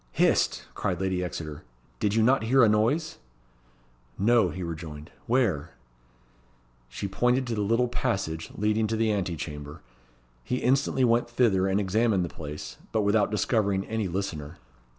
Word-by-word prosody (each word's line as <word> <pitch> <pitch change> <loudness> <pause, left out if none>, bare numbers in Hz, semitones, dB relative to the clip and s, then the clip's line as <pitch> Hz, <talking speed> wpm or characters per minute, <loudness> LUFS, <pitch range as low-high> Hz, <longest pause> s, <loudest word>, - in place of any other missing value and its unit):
"Hist!" - - +2
cried 90 -3 -2
Lady 95 -1 -1
Exeter. 75 -4 -6 0.4
"Did 105 0 +1
you 110 - +4
not 125 0 +3
hear 130 +2 +5
a - - +7
noise?" 115 +10 +1 1.0
"No," 115 +3 +4
he 95 - -5
rejoined. 80 -2 -7 0.2
"Where?" 105 - +1 1.1
She 100 - -4
pointed 125 +6 +1
to 120 - -3
the 105 - -1
little 115 +4 +2
passage 95 -10 -2
leading 110 +1 +1
to 110 - -1
the 110 -1 +2
ante 90 -4 -1
chamber. 75 -2 -7 0.6
He 125 - -2
instantly 130 +1 +1
went 120 0 +3
thither, 110 -6 +2
and 95 +1 +1
examined 100 -1 +1
the - - -6
place, 75 -5 -7
but 110 - +1
without 100 0 +3
discovering 100 -2 +1
any 110 -2 -2
listener. 85 -4 -4
105 Hz, 150 wpm, -27 LUFS, 90-115 Hz, 1.1 s, a